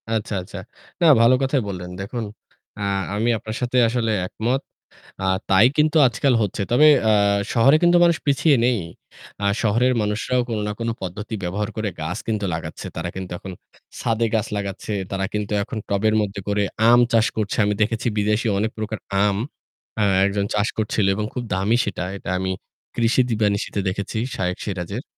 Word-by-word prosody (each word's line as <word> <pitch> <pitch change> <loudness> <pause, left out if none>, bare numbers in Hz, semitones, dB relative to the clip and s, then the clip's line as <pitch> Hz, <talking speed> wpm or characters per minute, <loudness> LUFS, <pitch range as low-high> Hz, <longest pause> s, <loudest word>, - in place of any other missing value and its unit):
আচ্ছা, 110 -1 -2
আচ্ছা। 90 - -10 0.4
না - - +4 0.2
ভালো 115 +2 +6
কথাই 135 0 +1
বললেন 90 -3 -5
দেখুন। 110 +4 -4 0.5
আ - - -5 0.3
আমি 110 +3 +1
আপনার 110 +1 -6
সাথে 125 +1 0
আসলে 115 -1 0
একমত। 120 +8 -1 0.6
আ - - -2 0.2
তাই 95 +4 +6
কিন্তু 155 +1 +2
আজকাল 125 +2 +1
হচ্ছে। 100 0 -2
তবে 125 +6 +6 0.2
আ - - +5 0.4
শহরে 130 +5 +5
কিন্তু 175 0 +5
মানুষ 170 -1 +4
পিছিয়ে 140 +1 +3
নেই। 120 -2 +2 0.6
আ - - -1 0.2
শহরের 120 +4 +2
মানুষরাও 105 +4 0
কোন 115 -2 -2
না - - -2
কোন 115 - -2
পদ্ধতি 95 +4 -5
ব্যবহার 100 +4 -2
করে 110 -1 -1
গাছ 80 +3 -3
কিন্তু 105 -2 -1
লাগাচ্ছে। 80 -1 -6
তারা 85 +1 -3
কিন্তু 95 -1 -6
এখন 95 - -8 0.5
ছাদে 115 0 0
গাছ 110 0 +1
লাগাচ্ছে। 100 +1 -4 0.2
তারা 95 0 -2
কিন্তু 105 -1 -2
এখন 110 +2 -5
টবের 110 +2 +1
মধ্যে 100 -1 -4
করে 105 0 +1 0.3
আম 120 +1 +7
চাষ 115 -1 +4
করছে। 105 -2 -1
আমি 105 0 +1
দেখেছি 115 +2 -1
বিদেশি 105 +3 +1
অনেক 110 +2 0
প্রকার 110 0 -3 0.3
আম 100 -1 +2 0.6
আ - - +3 0.2
একজন 100 0 -1
চাষ 105 0 +1
করছিল 105 -1 0
এবং 105 +2 -2
খুব 125 - -3
দামি 95 +5 +2
সেটা। 100 - -4
এটা 100 - -9
আমি 95 0 -2 0.5
কৃষি 120 +2 +2
দিবানিশিতে 105 -2 0
দেখেছি, 100 +3 -3 0.2
শায়েখ 90 -1 -1
সিরাজের। 100 +3 -4
105 Hz, 175 wpm, -22 LUFS, 100-115 Hz, 0.6 s, আম